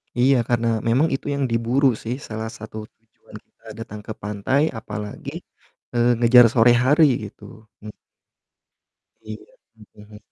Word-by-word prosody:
Iya 130 +2 +3
karena 115 -1 +1
memang 125 +9 +1
itu - - -8
yang 140 - -2
diburu 120 +4 +1 0.2
sih, 120 +3 -3
salah 110 0 -5
satu 110 0 -10
tujuan 110 -1 -21
kita 115 - -34
datang 105 -2 -8
ke 110 - -4
pantai 105 +7 -1 0.2
apalagi, 105 -1 -7 0.6
eee, 120 0 +2
ngejar 120 +1 +7
sore 120 0 +4
hari 150 +4 +4 0.2
gitu, 105 - -18 0.4
m 105 - -7 1.3
Iya, 110 0 -9 0.3
mhm, 105 -1 -18
hmm. 105 - -13
115 Hz, 140 wpm, -22 LUFS, 110-125 Hz, 1.3 s, ngejar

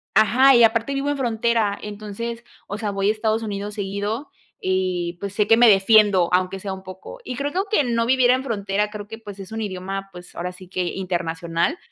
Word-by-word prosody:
Ajá 255 +6 +6
y 235 - +6
aparte 230 +4 +2
vivo 275 +1 -1
en 290 - -1
frontera. 230 -4 0
Entonces, 215 +3 -6 0.2
o 205 - -4
sea, 210 -1 -2
voy 195 0 -1
a - - +5
Estados 220 +1 0
Unidos 205 -1 -4
seguido 205 +6 -3 0.3
y 185 -2 -1
pues, 200 -1 -4
sé 210 0 +1
que 225 - +7
me 240 0 +7
defiendo, 200 -2 +5
aunque 185 +1 +1
sea 195 0 -4
un 190 - -9
poco. 190 - -10
Y 250 - -5
creo 285 +1 -2
que - - -3
aunque 395 -6 +1
no 230 -1 +1
viviera 250 0 +4
en 260 - -3
frontera, 210 -3 -1
creo 210 -1 -7
que, 225 +1 -8
pues, 205 -3 -10
es 195 0 -9
un 225 - -3
idioma, 195 0 -5
pues, 180 0 -13
ahora 180 +1 -4
sí 185 0 -14
que 185 0 -2
internacional. 175 - -2
205 Hz, 215 wpm, -22 LUFS, 190-230 Hz, 0.3 s, que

